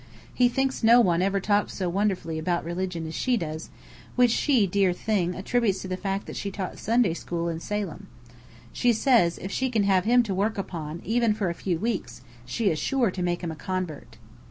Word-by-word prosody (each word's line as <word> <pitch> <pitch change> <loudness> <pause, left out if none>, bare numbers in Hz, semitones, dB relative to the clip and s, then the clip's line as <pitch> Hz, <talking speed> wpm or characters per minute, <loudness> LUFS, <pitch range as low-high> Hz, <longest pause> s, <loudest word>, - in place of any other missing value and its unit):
He 245 -1 +4
thinks 270 +2 -1
no 235 +2 +7
one 180 -7 +3
ever 195 +1 +1
talked 205 +1 +1
so 185 - -3
wonderfully 180 -3 -1
about 170 0 -1
religion 175 -1 -3
as 160 - -6
she 250 +5 +1
does, 160 -4 -5 0.5
which 245 -2 +5
she, 250 -3 +3
dear 195 -1 +2
thing, 180 -2 -1
attributes 200 -1 0
to - - -5
the 185 - -2
fact 195 +1 -3
that - - -8
she 200 - -3
taught 190 -1 -5
Sunday 230 -5 +2
school 170 0 -3
in 165 -1 -3
Salem. 205 +3 -4 0.7
She 245 -1 +3
says, 225 -8 +3
if 190 - -6
she 260 +4 0
can 225 -4 +1
have 195 -2 +3
him 245 +2 +5
to 205 -4 -3
work 205 +4 0
upon 165 -4 -5
even 230 -1 +2
for 195 -5 -1
a - - -3
few 175 0 -2
weeks, 185 - -3 0.2
she 200 - +1
is 155 - -2
sure 255 -7 +1
to 185 - -5
make 175 -1 -1
him 170 - -2
a - - -6
convert. 185 -2 -5
195 Hz, 210 wpm, -26 LUFS, 175-225 Hz, 0.7 s, no